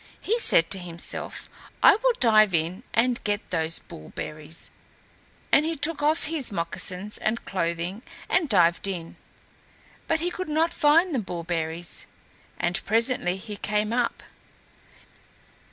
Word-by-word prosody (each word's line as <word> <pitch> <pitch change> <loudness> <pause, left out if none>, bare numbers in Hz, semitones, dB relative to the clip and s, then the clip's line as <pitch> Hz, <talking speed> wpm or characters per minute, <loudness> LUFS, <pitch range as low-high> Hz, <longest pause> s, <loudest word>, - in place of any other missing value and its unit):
He 455 +4 0
said 165 - +4
to 195 - -1
himself, 170 -1 -4 0.4
"I - - +9
will - - +2
dive 215 -5 +5
in 165 +5 -1
and 245 +1 +1
get 205 0 -2
those 165 -2 0
bull 80 - -11
berries"; 155 +1 -6 0.8
and 300 - +6
he 325 +1 -1
took 300 +1 -1
off 305 +2 +2
his 305 -6 0
moccasins 180 +3 -2
and 220 +2 -1
clothing 175 +2 -2 0.3
and 345 -5 +2
dived 175 -3 +3
in, 170 -4 -5 0.9
but 325 -1 +1
he 350 +2 -1
could 370 -2 -5
not 320 +2 +2
find 320 +4 +4
the 265 - +1
bullberries, 170 -3 -3 0.5
and 175 +1 -1
presently 225 -4 +1
he 205 +1 -8
came 210 +2 0
up. 240 -1 0
210 Hz, 135 wpm, -26 LUFS, -, 0.9 s, I